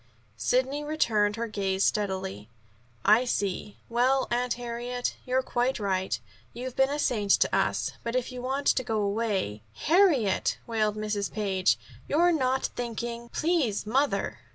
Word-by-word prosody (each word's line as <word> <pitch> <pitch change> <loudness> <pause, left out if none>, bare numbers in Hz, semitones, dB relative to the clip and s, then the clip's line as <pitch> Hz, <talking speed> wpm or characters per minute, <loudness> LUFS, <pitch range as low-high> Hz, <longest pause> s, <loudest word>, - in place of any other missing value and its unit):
Sidney 260 - +1
returned 220 -9 +1
her 230 +1 -2
gaze 195 -2 -1
steadily. 190 - -1 0.6
"I 230 +4 +6
see. 205 -4 -2
Well, 255 +3 +2
Aunt 245 0 +1
Harriet, 245 +1 -3
you're 260 +1 +2
quite 250 0 0
right. 190 -2 -1 0.3
You've 250 +1 -6
been 265 0 +3
a 290 - -1
saint 215 -8 0
to - - +3
us, - - +1
but 235 +1 -3
if 255 0 -1
you 250 -1 -6
want 270 +3 -2
to 255 - +3
go 225 -3 -1
away 200 - -1
" 105 - -33
"Harriet!" 310 - +3
wailed 215 -2 0
Mrs. 210 -1 -2
Page, 190 - +1 0.3
"you're 345 +4 +4
not 265 -4 +1
thinking 235 0 -4
" - - -33
"Please, 305 - 0
mother." 270 +7 0
235 Hz, 155 wpm, -28 LUFS, 205-260 Hz, 0.6 s, I